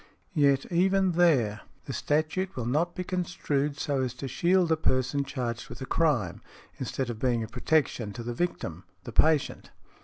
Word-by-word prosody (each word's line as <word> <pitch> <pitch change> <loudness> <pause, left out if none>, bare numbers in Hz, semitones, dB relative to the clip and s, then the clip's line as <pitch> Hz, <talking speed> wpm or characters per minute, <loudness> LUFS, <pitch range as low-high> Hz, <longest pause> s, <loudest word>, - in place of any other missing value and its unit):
Yet, 140 -2 +3
even 190 +2 +3
there, 140 -12 +3 0.2
the 135 - -5
statute 155 +7 0
will 120 - -3
not 155 +8 0
be 180 - -3
construed 155 -6 -1
so 140 -4 0
as 130 -1 -2
to 135 +2 -5
shield 175 +6 +2
a - - +5
person 135 -2 +1
charged 125 -4 -4
with - - -9
a 130 - -5
crime, 130 - +1 0.4
instead 130 -3 -2
of 110 - -8
being 120 -2 +1
a - - -5
protection 125 -2 0
to 120 - -6
the 120 +1 -3
victim, 95 - -3 0.2
the - - -7
patient. 155 -3 +2
140 Hz, 175 wpm, -28 LUFS, 125-165 Hz, 0.4 s, a